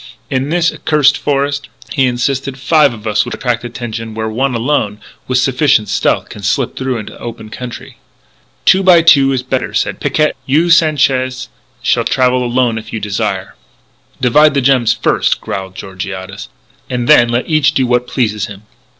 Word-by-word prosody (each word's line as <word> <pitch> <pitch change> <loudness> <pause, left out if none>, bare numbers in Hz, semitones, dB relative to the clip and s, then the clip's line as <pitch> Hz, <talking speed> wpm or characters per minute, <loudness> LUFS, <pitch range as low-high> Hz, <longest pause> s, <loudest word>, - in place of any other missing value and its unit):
"In 135 +1 -1
this 170 0 +1
accursed 150 -3 +2
forest," 140 0 -2 0.2
he 135 -3 +2
insisted, 130 +2 -2
"five 145 +1 +3
of 115 -2 -11
us 105 -1 +1
would 120 - -5
attract 125 -2 -2
attention 115 -2 -6
where 110 0 -3
one 125 +3 -1
alone, 115 -4 -1 0.3
with 130 - +1
sufficient 130 -3 +2
stealth, - - 0
can 105 - -10
slip 115 +6 -1
through 130 -2 -2
into 110 - -8
the - - -15
open 115 -2 -8
country." 125 0 -8 0.7
"Two 190 - +5
by 180 -3 +5
two 140 -5 +5
is 130 -2 -1
better," 130 0 -3
said - - -1
Picquet. 155 0 +1 0.2
"You, 160 +6 +2
Sanchez, 130 -5 +2 0.3
shall 120 -1 +2
travel 125 +1 +1
alone 120 -2 0
if 110 0 -12
you 110 - -3
desire 100 -2 -3 0.4
" - - -37
"Divide 150 +4 +4
the - - +3
gems 125 -3 +3
first," - - 0
growled 95 -1 -6
Georgiades, 95 +2 -7 0.4
"and 125 -2 -2
then 120 0 +6
let 120 +1 -1
each 155 -2 +2
do 130 - +2
what 125 0 0
pleases 105 -5 -1
him." 100 0 -11
125 Hz, 175 wpm, -14 LUFS, 110-140 Hz, 0.7 s, then